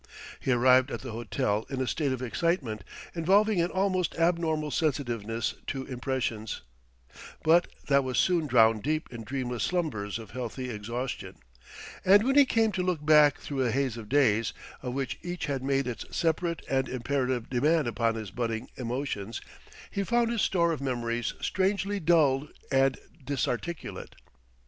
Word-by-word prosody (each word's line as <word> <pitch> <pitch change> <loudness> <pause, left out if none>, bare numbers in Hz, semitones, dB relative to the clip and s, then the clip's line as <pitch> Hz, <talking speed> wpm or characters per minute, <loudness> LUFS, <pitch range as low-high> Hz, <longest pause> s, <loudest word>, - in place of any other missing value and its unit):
He 130 - -1
arrived 130 +2 +5
at - - -5
the 130 - -6
hotel 110 -2 -1
in 135 - -3
a 130 - +1
state 145 +2 0
of 130 -1 -3
excitement 130 - -1 0.3
involving 195 +3 +3
an 170 - +1
almost 185 -2 0
abnormal 165 -3 +1
sensitiveness 120 - -1
to 135 -1 -3
impressions; 125 - -3 0.8
but 170 +2 +5 0.2
that 140 -1 +4
was 130 -1 -2
soon 170 -4 +2
drowned 115 -4 +5
deep 155 +1 -2
in 115 -1 -6
dreamless 125 -1 -3
slumbers 130 - -1
of 110 -4 -10
healthy 125 +1 -4
exhaustion; 120 +4 -5 0.7
and 200 +3 +6
when 265 +3 +2
he 285 -1 +8
came 225 -2 +2
to 190 - -1
look 180 -5 -1
back 150 -2 +6
through 140 -2 -4
a 125 - +1
haze 130 0 0
of 110 -3 -9
days, 115 -6 +3 0.3
of 125 -1 -4
which 135 -2 -3
each 175 -1 -4
had 140 -2 -2
made 135 0 +1
its 125 -2 -4
separate 170 +1 -1
and 130 0 0
imperative 130 -1 -1
demand 150 +3 +2
upon 115 -1 0
his 110 -4 -6
budding 115 +1 -3
emotions, 120 -4 -3 0.5
he 200 - -1
found 235 +2 +2
his 230 -3 0
store 170 -2 +2
of 155 - -3
memories 120 -3 -2
strangely 195 +1 0
dulled 150 -4 +3 0.2
and 135 -1 +3 0.3
disarticulate. 140 +4 -3
135 Hz, 160 wpm, -28 LUFS, 120-165 Hz, 0.8 s, he